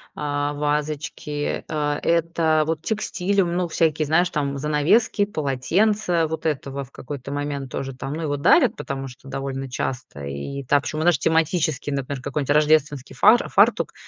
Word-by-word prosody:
а, 145 Hz, 0 st, -2 dB
вазочки. 150 Hz, 0 st, -2 dB
А, 150 Hz, -2 st, -1 dB
это 165 Hz, -2 st, +2 dB
вот 160 Hz, 0 st, -2 dB
текстиль, 200 Hz, -2 st, 0 dB
ну, 175 Hz, 0 st, -1 dB
всякие, 160 Hz, -1 st, +1 dB
знаешь, 165 Hz, +4 st, +3 dB
там, 140 Hz, -3 st, -2 dB
занавески, 155 Hz, -, +2 dB
полотенца. 175 Hz, +3 st, +1 dB
Вот 160 Hz, +1 st, -5 dB
этого 140 Hz, -2 st, -2 dB
в 135 Hz, -, -15 dB
какой-то 140 Hz, 0 st, -7 dB
момент 140 Hz, -2 st, -4 dB
тоже, 135 Hz, 0 st, -4 dB
там, 135 Hz, +2 st, -5 dB
ну, 160 Hz, -, -4 dB
его 145 Hz, -3 st, -1 dB
дарят, 140 Hz, -, +4 dB
потому 135 Hz, -2 st, -5 dB
что 125 Hz, +1 st, -13 dB
довольно 135 Hz, 0 st, -4 dB
часто 125 Hz, -, -4 dB
и 70 Hz, -, -5 dB
так, 145 Hz, -1 st, +3 dB
причём, 155 Hz, -, -3 dB
знаешь 175 Hz, +1 st, +4 dB
тематический, 160 Hz, -2 st, +1 dB
например, 140 Hz, -1 st, -3 dB
какой-то 140 Hz, +1 st, -1 dB
рождественский 150 Hz, -2 st, +2 dB
фар 220 Hz, +4 st, +5 dB
фартук, -, -, +3 dB
150 Hz, 155 wpm, -23 LUFS, 140-160 Hz, -, фар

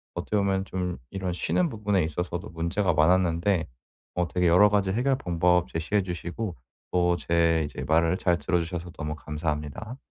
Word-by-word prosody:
어떻게 -, -, -3 dB
보면 95 Hz, -1 st, +1 dB
좀 90 Hz, -2 st, -3 dB
이런 95 Hz, -2 st, -3 dB
쉬는 170 Hz, -, 0 dB
부분에 105 Hz, -, 0 dB
있어서도 90 Hz, +5 st, -3 dB
문제가 85 Hz, +3 st, 0 dB
많았는데 85 Hz, +2 st, +3 dB, 0.5 s
어 90 Hz, -1 st, +1 dB
되게 90 Hz, 0 st, +1 dB
여러 90 Hz, +5 st, +6 dB
가지 100 Hz, -2 st, +1 dB
해결 130 Hz, +4 st, +1 dB
방법 90 Hz, -3 st, +2 dB
제시해 80 Hz, +5 st, 0 dB
주시고 90 Hz, +2 st, -4 dB, 0.4 s
또 90 Hz, -1 st, +3 dB
제 85 Hz, -1 st, +2 dB
이제 75 Hz, -, -6 dB
말을 80 Hz, +3 st, +3 dB
잘 90 Hz, -2 st, +2 dB
들어주셔서 85 Hz, 0 st, -2 dB
너무 75 Hz, -1 st, -5 dB
감사합니다. 75 Hz, -, -4 dB
90 Hz, 355 characters per minute, -26 LUFS, 85-95 Hz, 0.5 s, 여러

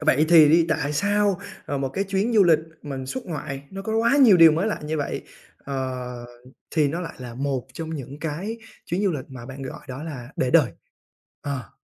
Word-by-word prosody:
vậy 155 Hz, -1 st, +3 dB
thì 160 Hz, -3 st, +8 dB
đi, 165 Hz, +1 st, +5 dB
tại 150 Hz, -2 st, 0 dB
sao, 205 Hz, +2 st, +2 dB, 0.3 s
à, 145 Hz, -, -2 dB
một 135 Hz, -1 st, -1 dB
cái 190 Hz, +9 st, -2 dB
chuyến 195 Hz, +4 st, 0 dB
du 210 Hz, -3 st, +6 dB
lịch 165 Hz, -3 st, +5 dB, 0.2 s
mình 135 Hz, -3 st, -5 dB
xuất 255 Hz, -, -5 dB
ngoại 150 Hz, -5 st, -5 dB
nó 195 Hz, 0 st, -6 dB
có 220 Hz, +2 st, -1 dB
quá 230 Hz, +5 st, +3 dB
nhiều 245 Hz, -9 st, +7 dB
điều 165 Hz, -2 st, +8 dB
mới 165 Hz, +6 st, 0 dB
lạ 220 Hz, -, -1 dB
như 155 Hz, +1 st, -2 dB
vậy, 145 Hz, -2 st, -3 dB, 0.4 s
ờ, 130 Hz, -3 st, -4 dB, 0.5 s
thì 150 Hz, -3 st, +2 dB
nó 165 Hz, +5 st, -3 dB
lại 170 Hz, -, -6 dB
là 125 Hz, -2 st, -8 dB
một 135 Hz, -1 st, -2 dB
trong 160 Hz, +3 st, -6 dB
những 140 Hz, -1 st, -7 dB
cái 175 Hz, +9 st, -4 dB, 0.3 s
chuyến 180 Hz, +4 st, -1 dB
du 195 Hz, -, +3 dB
lịch 140 Hz, -4 st, -4 dB
mà 130 Hz, -3 st, -9 dB
bạn 135 Hz, +1 st, -8 dB
gọi 130 Hz, -, -7 dB
đó 130 Hz, +2 st, -6 dB
là 135 Hz, -7 st, -7 dB
để 130 Hz, -, +1 dB
đời? -, -, +4 dB, 0.7 s
Ờ. 135 Hz, -7 st, -4 dB
150 Hz, 220 wpm, -24 LUFS, 135-185 Hz, 0.7 s, thì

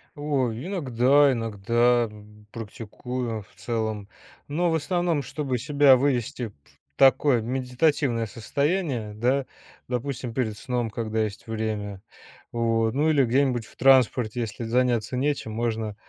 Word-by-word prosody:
Ой, 135 Hz, -3 st, -1 dB
иногда 140 Hz, -, +3 dB
иногда 115 Hz, +1 st, +1 dB, 0.4 s
практикую, 115 Hz, 0 st, -5 dB
в -, -, -25 dB
целом. 110 Hz, -3 st, -3 dB, 0.4 s
Но 170 Hz, +4 st, 0 dB
в -, -, +2 dB
основном, 170 Hz, -1 st, 0 dB
чтобы 135 Hz, -5 st, -3 dB
себя 140 Hz, +1 st, +5 dB
вывести 125 Hz, -2 st, -1 dB
в 105 Hz, -, -15 dB, 0.4 s
такое, 135 Hz, -2 st, +5 dB
медитативное 125 Hz, 0 st, 0 dB
состояние, 130 Hz, -, -2 dB
да, 130 Hz, +4 st, +1 dB, 0.4 s
допустим, 125 Hz, -1 st, -3 dB
перед 110 Hz, -5 st, -2 dB
сном, 120 Hz, -2 st, -2 dB
когда 110 Hz, 0 st, -2 dB
есть 105 Hz, +1 st, -6 dB
время. 105 Hz, -3 st, -3 dB, 0.5 s
Вот, 115 Hz, -1 st, +1 dB
ну, 150 Hz, +3 st, +2 dB
или 140 Hz, -4 st, +4 dB
где-нибудь 125 Hz, -2 st, +1 dB
в -, -, -18 dB
транспорте, 125 Hz, -3 st, +3 dB
если 115 Hz, +1 st, -5 dB
заняться 120 Hz, 0 st, +1 dB
нечем, 140 Hz, -4 st, -1 dB
можно 110 Hz, -2 st, -2 dB
120 Hz, 125 wpm, -25 LUFS, 110-140 Hz, 0.5 s, себя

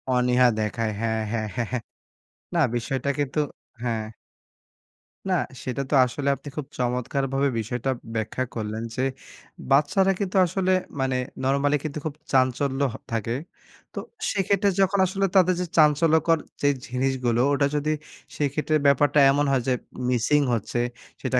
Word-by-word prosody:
অনীহা 125 Hz, 0 st, +4 dB
দেখায় 110 Hz, +1 st, -1 dB
হ্যাঁ, 110 Hz, -1 st, 0 dB
হ্যাঁ, 110 Hz, -2 st, -1 dB
হ্যাঁ, 120 Hz, -3 st, -1 dB
হ্যাঁ। 125 Hz, -3 st, -1 dB, 0.7 s
না, 170 Hz, -, +3 dB
বিষয়টা 135 Hz, +3 st, -1 dB
কিন্তু, 145 Hz, +1 st, 0 dB, 0.4 s
হ্যাঁ। 110 Hz, -2 st, -2 dB, 1.2 s
না, -, -, +2 dB, 0.3 s
সেটা 130 Hz, +1 st, -2 dB
তো -, -, +3 dB
আসলে 140 Hz, +3 st, -4 dB
আপনি -, -, -14 dB
খুব 145 Hz, -, -3 dB
চমৎকারভাবে 135 Hz, +3 st, 0 dB
বিষয়টা 125 Hz, +4 st, -3 dB, 0.3 s
ব্যাখ্যা 110 Hz, +3 st, -1 dB
করলেন 110 Hz, 0 st, -3 dB
যে 130 Hz, -, -1 dB, 0.7 s
বাচ্চারা 170 Hz, +8 st, +4 dB
কিন্তু 195 Hz, -1 st, -1 dB
আসলে 185 Hz, +1 st, 0 dB, 0.3 s
মানে 130 Hz, -1 st, 0 dB, 0.3 s
normally 140 Hz, +2 st, +2 dB
কিন্তু 155 Hz, -1 st, -4 dB
খুব 150 Hz, -2 st, -3 dB, 0.2 s
চাঞ্চল্য 130 Hz, +1 st, +2 dB
হ -, -, -7 dB, 0.2 s
থাকে। 115 Hz, +1 st, -1 dB, 0.6 s
তো, -, -, -4 dB, 0.3 s
সেক্ষেত্রে 200 Hz, +1 st, +2 dB
যখন 195 Hz, +1 st, +2 dB
আসলে 195 Hz, +1 st, 0 dB
তাদের 185 Hz, -1 st, +5 dB
যে 180 Hz, -, -1 dB
চাঞ্চল্যকর 160 Hz, +2 st, +4 dB, 0.2 s
যেই 145 Hz, 0 st, +4 dB
জিনিসগুলো, 125 Hz, -2 st, 0 dB
ওটা 140 Hz, 0 st, +2 dB
যদি 150 Hz, +1 st, 0 dB, 0.4 s
সেইক্ষেত্রে 150 Hz, +2 st, 0 dB
ব্যাপারটা 145 Hz, +1 st, +4 dB
এমন 145 Hz, +1 st, +2 dB
হয় 130 Hz, -, +2 dB
যে 130 Hz, -, +3 dB, 0.4 s
missing 130 Hz, +4 st, +3 dB
হচ্ছে, 115 Hz, +1 st, -2 dB, 0.4 s
সেটা -, -, +1 dB
135 Hz, 140 wpm, -25 LUFS, 125-150 Hz, 1.2 s, তাদের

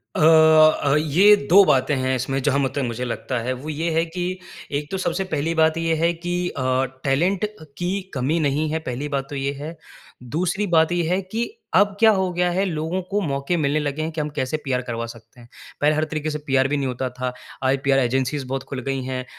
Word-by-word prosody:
अ, -, -, -1 dB
अ, 155 Hz, -2 st, +6 dB
ये 175 Hz, +8 st, +5 dB
2 200 Hz, +3 st, +8 dB
बातें 135 Hz, 0 st, +2 dB
हैं 130 Hz, 0 st, 0 dB
इसमें 135 Hz, +2 st, -2 dB
जहाँ 140 Hz, +1 st, +1 dB
म 135 Hz, -, +2 dB
तक 140 Hz, -, 0 dB
मुझे 120 Hz, +2 st, -4 dB
लगता 125 Hz, +1 st, -3 dB
है। 130 Hz, +2 st, -1 dB
वो 130 Hz, +5 st, -7 dB
ये 160 Hz, +3 st, -2 dB
है 165 Hz, +1 st, +2 dB
कि, 180 Hz, +2 st, -4 dB, 0.3 s
एक 145 Hz, +1 st, -3 dB
तो 190 Hz, -, -1 dB
सबसे 185 Hz, +1 st, -1 dB
पहली 155 Hz, +3 st, 0 dB
बात 160 Hz, 0 st, +3 dB
ये 165 Hz, -1 st, +1 dB
है 165 Hz, +2 st, +2 dB
कि 175 Hz, +1 st, -5 dB, 0.2 s
अ, 130 Hz, -, -5 dB, 0.4 s
टैलेंट 175 Hz, +9 st, +1 dB
अ, 210 Hz, -5 st, -10 dB
की 185 Hz, +3 st, -1 dB
कमी 140 Hz, +5 st, 0 dB
नहीं 150 Hz, +1 st, 0 dB
है, 160 Hz, -, -1 dB
पहली 135 Hz, -1 st, -4 dB
बात 135 Hz, 0 st, -5 dB
तो 145 Hz, -, -6 dB
ये 140 Hz, 0 st, -1 dB
है। 160 Hz, +3 st, -6 dB, 0.5 s
दूसरी 180 Hz, -, -1 dB
बात 160 Hz, -2 st, +3 dB
ये 175 Hz, -1 st, +1 dB
है 185 Hz, +2 st, +1 dB
कि 220 Hz, -, -3 dB, 0.3 s
अब 205 Hz, +2 st, +6 dB
क्या 220 Hz, -1 st, +7 dB
हो 190 Hz, -2 st, 0 dB
गया 180 Hz, 0 st, +1 dB
है, 185 Hz, +3 st, +1 dB
लोगों 165 Hz, +1 st, -2 dB
को 205 Hz, -, 0 dB
मौके 140 Hz, +1 st, -1 dB
मिलने 150 Hz, -1 st, +1 dB
लगे 145 Hz, 0 st, -2 dB
हैं 160 Hz, +1 st, -2 dB
कि 155 Hz, -1 st, -3 dB
हम 150 Hz, -, -3 dB
कैसे 130 Hz, +4 st, -1 dB
पीआर 130 Hz, -2 st, 0 dB
करवा 115 Hz, -2 st, -4 dB
सकते 115 Hz, +1 st, -13 dB
हैं। 120 Hz, -, -15 dB, 0.3 s
पहले 150 Hz, +1 st, +3 dB
हर 155 Hz, -, +1 dB
तरीके 155 Hz, 0 st, -2 dB
से 150 Hz, -, -2 dB
पीआर 135 Hz, -1 st, +3 dB
भी 145 Hz, +2 st, 0 dB
नहीं 140 Hz, -2 st, -1 dB
होता 125 Hz, +1 st, -3 dB
था। 125 Hz, 0 st, -4 dB, 0.3 s
आज 130 Hz, +1 st, +2 dB
पीआर 135 Hz, -1 st, +3 dB
एजेंसीज़ 130 Hz, +2 st, 0 dB
बहुत 135 Hz, 0 st, -3 dB
खुल 135 Hz, -, -4 dB
गई 135 Hz, +1 st, -2 dB
हैं। 130 Hz, 0 st, -4 dB
150 Hz, 235 wpm, -22 LUFS, 135-170 Hz, 0.5 s, 2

